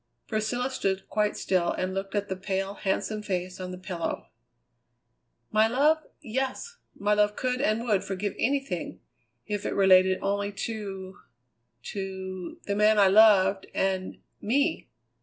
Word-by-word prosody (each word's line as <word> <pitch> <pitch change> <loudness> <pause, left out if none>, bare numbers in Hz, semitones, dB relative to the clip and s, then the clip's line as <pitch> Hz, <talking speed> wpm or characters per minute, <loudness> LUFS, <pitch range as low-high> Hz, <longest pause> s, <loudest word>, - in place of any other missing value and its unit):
Priscilla 240 +4 -1
stood 195 -6 -1
quite 210 -1 0
still 180 -2 +1
and 185 0 -2
looked 195 +1 -4
at 205 0 0
the 190 - -3
pale, 195 +1 -2
handsome 210 +2 -2
face 185 -2 -3
on 185 -1 -5
the 180 - -6
pillow. 180 -2 -4 1.2
"My 215 +1 +4
love 290 +7 +3 0.2
yes; 265 - -3 0.2
my 205 +1 +1
love 210 0 +2
could 255 0 -1
and 220 -3 +1
would 210 -5 +1
forgive 195 +1 -3
anything, 275 +2 -1 0.5
if 205 -2 -3
it - - -2
related 190 -1 +5
only 200 +1 -1
to 200 -3 -5 0.6
to 190 -2 -6
the 200 - -2
man 210 +1 +4
I 200 -2 +6
loved 195 -2 +5
and 190 -1 -1 0.2
me!" 280 +9 0
200 Hz, 140 wpm, -27 LUFS, 190-220 Hz, 1.2 s, I